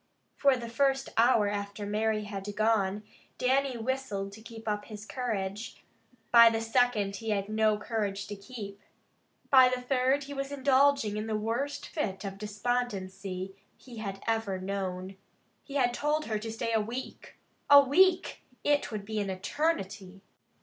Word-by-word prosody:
For 275 Hz, -2 st, +4 dB
the 235 Hz, -1 st, -6 dB
first 270 Hz, +3 st, +1 dB
hour 230 Hz, -2 st, +4 dB
after 205 Hz, 0 st, -4 dB
Mary 215 Hz, +1 st, 0 dB
had 205 Hz, 0 st, -6 dB
gone 210 Hz, -2 st, +1 dB, 0.3 s
Dannie 265 Hz, 0 st, +1 dB
whistled 225 Hz, -5 st, -3 dB
to 215 Hz, +2 st, -12 dB
keep 225 Hz, 0 st, -11 dB
up 210 Hz, -1 st, -1 dB
his 210 Hz, -1 st, -9 dB
courage. 215 Hz, -4 st, -4 dB, 0.5 s
By 235 Hz, -1 st, +9 dB
the 225 Hz, 0 st, -1 dB
second 225 Hz, -4 st, +1 dB
he 225 Hz, +2 st, -5 dB
had 200 Hz, -2 st, 0 dB
no 215 Hz, 0 st, +2 dB
courage 205 Hz, -2 st, -2 dB
to 205 Hz, -, -6 dB
keep. 200 Hz, -1 st, -9 dB, 0.7 s
By 260 Hz, -2 st, +8 dB
the 255 Hz, 0 st, -1 dB
third 260 Hz, +2 st, +1 dB
he 285 Hz, +1 st, -7 dB
was 275 Hz, 0 st, -4 dB
indulging 275 Hz, -5 st, +3 dB
in 215 Hz, +1 st, -3 dB
the 220 Hz, -, -1 dB
worst 240 Hz, +7 st, -2 dB
fit 195 Hz, -, -3 dB
of 195 Hz, 0 st, -6 dB
despondency 195 Hz, -4 st, -3 dB, 0.2 s
he 235 Hz, -4 st, -10 dB, 0.2 s
ever 225 Hz, -3 st, 0 dB
had 185 Hz, -, -6 dB
known. 190 Hz, -1 st, -4 dB, 0.5 s
He 280 Hz, -, -10 dB
had 245 Hz, -3 st, +2 dB
told 300 Hz, +4 st, 0 dB
her 215 Hz, -2 st, -2 dB
to 225 Hz, +1 st, -5 dB
stay 230 Hz, +1 st, -2 dB
a 220 Hz, -, +3 dB
week. 240 Hz, +5 st, -7 dB, 0.3 s
A 285 Hz, -, +11 dB
week! 355 Hz, +7 st, +3 dB, 0.2 s
It 290 Hz, -3 st, +2 dB
would 210 Hz, -2 st, -5 dB
be 215 Hz, 0 st, -3 dB
an 200 Hz, -1 st, -2 dB
eternity! 195 Hz, -, -2 dB
220 Hz, 160 wpm, -29 LUFS, 200-255 Hz, 0.7 s, A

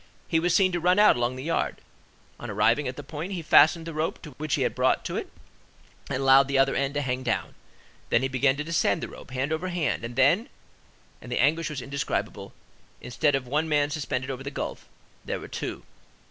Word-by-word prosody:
He 165 Hz, -, +2 dB
was 175 Hz, +1 st, +1 dB
seen 190 Hz, -2 st, +4 dB
to 175 Hz, -, -1 dB
run 180 Hz, +3 st, +3 dB
out 210 Hz, 0 st, +6 dB
along 120 Hz, +1 st, -1 dB
the 130 Hz, -, -7 dB
yard: 165 Hz, +2 st, -1 dB, 0.6 s
on -, -, -7 dB
arriving 120 Hz, +5 st, +2 dB
at 130 Hz, -, -4 dB
the -, -, -8 dB
point, 165 Hz, +5 st, -6 dB
he 175 Hz, -3 st, -4 dB
fastened 160 Hz, +2 st, +5 dB
the 165 Hz, -, -6 dB
rope 155 Hz, +2 st, -3 dB
which 155 Hz, -1 st, 0 dB
he -, -, 0 dB
had -, -, 0 dB
brought -, -, +1 dB
to -, -, -3 dB
it, -, -, -4 dB, 0.8 s
and 130 Hz, -, -2 dB
allowed 135 Hz, 0 st, +6 dB
the 140 Hz, 0 st, 0 dB
other 135 Hz, 0 st, +3 dB
end 140 Hz, +1 st, -1 dB
to 145 Hz, -, +1 dB
hang 130 Hz, -1 st, -2 dB
down, 120 Hz, -3 st, -2 dB, 0.6 s
then 115 Hz, -, +3 dB
he -, -, +2 dB
began 135 Hz, 0 st, +2 dB
to 145 Hz, -, -3 dB
descend 165 Hz, 0 st, 0 dB
the -, -, -3 dB
rope, -, -, -12 dB
hand 130 Hz, +4 st, -2 dB
over 165 Hz, +4 st, -2 dB
hand, 175 Hz, -9 st, -1 dB
and 120 Hz, +1 st, -6 dB
then,—and 140 Hz, -, -2 dB
the 125 Hz, -, 0 dB
anguish 155 Hz, +6 st, +2 dB
was 145 Hz, -4 st, -5 dB
indescribable,—instead 140 Hz, 0 st, -3 dB
of 135 Hz, -2 st, -2 dB
one 150 Hz, +5 st, -1 dB
man 145 Hz, -1 st, +2 dB
suspended 135 Hz, -3 st, -3 dB
over 130 Hz, 0 st, -6 dB
the 140 Hz, -, -5 dB
gulf, 140 Hz, -, -6 dB, 0.4 s
there -, -, -3 dB
were -, -, -9 dB
two. -, -, -5 dB
145 Hz, 215 wpm, -26 LUFS, 130-160 Hz, 0.8 s, out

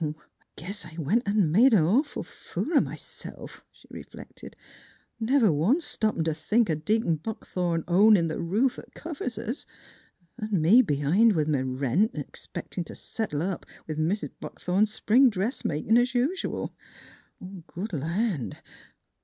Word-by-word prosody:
" -, -, 0 dB
I 150 Hz, 0 st, -2 dB, 0.4 s
guess 200 Hz, +7 st, -6 dB
I 160 Hz, -2 st, -11 dB
went 195 Hz, -, 0 dB
an' 200 Hz, -6 st, +2 dB
made 230 Hz, +7 st, +6 dB
a -, -, +6 dB
nawful 235 Hz, -, +1 dB
fool 340 Hz, -, -5 dB
o' -, -, +7 dB
m'self," -, -, -8 dB
she -, -, -22 dB
reflected; -, -, -11 dB, 0.6 s
"never 230 Hz, -2 st, +3 dB
once 215 Hz, -, +2 dB
stoppin' 215 Hz, -7 st, -1 dB
t' 160 Hz, -1 st, 0 dB
think 210 Hz, +6 st, +1 dB
o' -, -, +2 dB
Deacon 165 Hz, +2 st, 0 dB
Buckthorn 175 Hz, -3 st, -3 dB
ownin' 190 Hz, 0 st, +5 dB
th' 160 Hz, -, -4 dB
roof 215 Hz, +10 st, +1 dB
'at -, -, -15 dB
covers 285 Hz, -8 st, -5 dB
us 235 Hz, +5 st, -5 dB, 0.7 s
an' 215 Hz, -4 st, -1 dB
me 190 Hz, +11 st, +6 dB
b'hind 165 Hz, -, +3 dB
with 155 Hz, -3 st, +1 dB
m' 130 Hz, -2 st, -1 dB
rent, 165 Hz, -, +1 dB
expectin' -, -, -6 dB
t' -, -, -10 dB
settle 165 Hz, -10 st, -3 dB
up 185 Hz, -1 st, -3 dB, 0.2 s
with 155 Hz, -1 st, -4 dB
Mis' 175 Hz, +7 st, 0 dB
Buckthorn's 200 Hz, +4 st, 0 dB
spring 245 Hz, +5 st, +4 dB
dressmakin', 210 Hz, -, 0 dB
es 245 Hz, +1 st, 0 dB
usual. 290 Hz, +11 st, -1 dB, 0.9 s
Good 195 Hz, +4 st, -6 dB
land 165 Hz, -, -1 dB
200 Hz, 145 wpm, -27 LUFS, 160-230 Hz, 0.9 s, o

